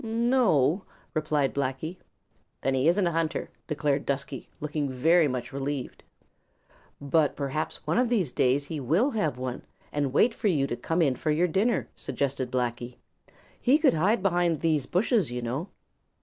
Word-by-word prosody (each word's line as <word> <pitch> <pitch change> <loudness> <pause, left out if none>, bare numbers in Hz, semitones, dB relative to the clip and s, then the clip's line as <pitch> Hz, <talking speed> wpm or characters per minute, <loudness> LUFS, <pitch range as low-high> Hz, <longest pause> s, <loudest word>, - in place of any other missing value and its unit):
"No 235 +2 +2
o," 150 +6 +2 0.3
replied 150 -3 0
Blacky. 140 +6 -3 0.6
"Then 135 - +1
he 130 +3 +2
isn't 180 +3 +3
a 170 - +1
hunter," 165 0 -2 0.2
declared 145 -2 0
Dusky, 140 -1 -3
looking 150 -1 -2 0.4
much 125 0 -5
relieved. 140 -1 -4 1.0
"But 145 +1 +1
perhaps 140 +2 -3
one - - +1
of 250 -1 +2
these 195 - +1
days 130 +4 +2
he 155 +1 -5
will 170 - +2
have 160 - -1
one 125 -1 -4 0.3
and 145 -1 0
will 130 - -7
wait 230 - +4
for 225 -1 -2
you 150 -8 +2
to 120 - -3
come 165 +6 0
in 135 -4 +2
for 155 - -3
your 160 +4 +3
dinner," 205 +8 +1
suggested 135 -2 -2
Blacky. 120 -1 -2 0.7
"He 265 +4 +5
could 310 -2 +4
hide 190 +7 +2
behind 175 -4 +2
these 155 -5 +1
bushes, 200 - +1
you 125 0 -4
know." 130 +10 -3
150 Hz, 165 wpm, -27 LUFS, 135-180 Hz, 1.0 s, He